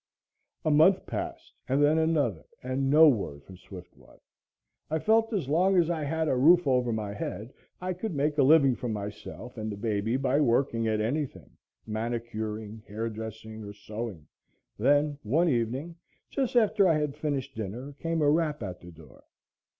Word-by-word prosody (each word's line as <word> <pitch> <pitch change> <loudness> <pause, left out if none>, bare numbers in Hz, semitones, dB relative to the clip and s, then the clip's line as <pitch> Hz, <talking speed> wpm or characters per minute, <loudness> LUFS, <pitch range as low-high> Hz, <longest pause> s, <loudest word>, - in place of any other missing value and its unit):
A 155 - +3
month 160 +6 +5
passed - - -6 0.2
and 135 +2 +2
then 155 +2 +4
another 145 - +1 0.2
and 130 +1 -1
no 155 +3 +8
word 95 - 0
from 95 - -13
Swiftwater. 90 -1 -14 0.7
I 160 - 0
felt 225 +6 +2
as 195 - -1
long 180 +6 +3
as 175 -1 +3
I 160 -3 -2
had 160 +2 -1
a 130 - +2
roof 170 +7 +5
over 125 -3 +2
my 105 -2 -3
head, 110 +3 -6 0.3
I 185 +1 -2
could 185 0 -5
make 145 +2 0
a - - +7
living 140 -1 +6
for 120 0 -5
myself 105 +3 -7
and 110 0 -4
the 100 - -6
baby 110 +2 -1
by 135 +1 +1
working 115 -3 +1
at 110 -1 0
anything 140 +5 -3 0.3
manicuring, 110 -1 -4
hairdressing 110 0 -6
or 100 0 -8
sewing. 105 -5 -7 0.5
Then, 145 +4 +2
one 150 +10 +2
evening, 130 +7 -2 0.3
just 265 -3 -1
after 215 -4 +4
I 165 -3 +3
had 150 -2 -2
finished 145 -4 -3
dinner, 115 +7 -6
came 165 -1 -1
a 145 - +4
rap 155 -4 0
at 90 -3 -6
the 85 - -11
door. 80 -5 -16
130 Hz, 170 wpm, -28 LUFS, 110-155 Hz, 0.7 s, no